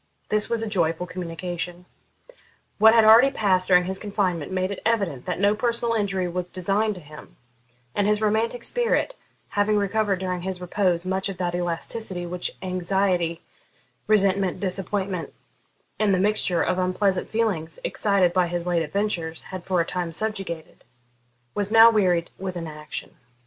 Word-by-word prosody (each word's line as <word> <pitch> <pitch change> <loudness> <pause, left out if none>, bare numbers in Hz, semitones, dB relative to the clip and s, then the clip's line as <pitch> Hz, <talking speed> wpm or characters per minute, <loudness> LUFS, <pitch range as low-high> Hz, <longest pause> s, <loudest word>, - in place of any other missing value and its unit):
This 215 0 +2
was 230 -1 0
a - - -3
joyful 175 -4 0
communication. 175 0 -5 0.9
What 220 +2 +7
had 225 -1 +6
already 230 +5 +8
passed 190 -8 +2
during 180 -1 +5
his 190 +1 -3
confinement 190 -6 -2
made 185 +1 -1
it 200 - -6
evident 195 - 0
that 180 - -2
no 200 +1 +4
personal 235 +1 0
injury 195 -4 0
was 180 0 -4
designed 200 +4 0
to 180 - -10
him; 150 0 -13 0.6
and 205 - +1
his 210 0 +2
romantic 220 +3 0
spirit, 485 +1 +2 0.4
having 205 +1 +1
recovered 205 0 +1
during 180 -1 -3
his 185 0 -4
repose 180 -1 0
much 190 +1 -1
of 195 - -6
that 175 -1 -2
elasticity 175 +2 -2
which 180 0 -4
anxiety, 180 -2 0 0.6
resentment, 195 -3 +2
disappointment, 190 -1 -3 0.6
and 205 -3 +3
the - - 0
mixture 195 -4 +1
of 185 - 0
unpleasant 185 +1 0
feelings 200 -8 -1
excited 195 -4 +1
by 180 -1 +2
his 175 0 -3
late 175 -2 +1
adventures 165 -1 -2
had 185 -2 -8
for 185 -2 +1
a - - -1
time 175 -1 -3
subjugated, 195 -4 -5 0.7
was 205 0 -2
now 225 +1 +8
wearied 180 -6 +1
with 185 -1 -4
inaction. 150 -4 -7
185 Hz, 155 wpm, -24 LUFS, 175-210 Hz, 0.9 s, already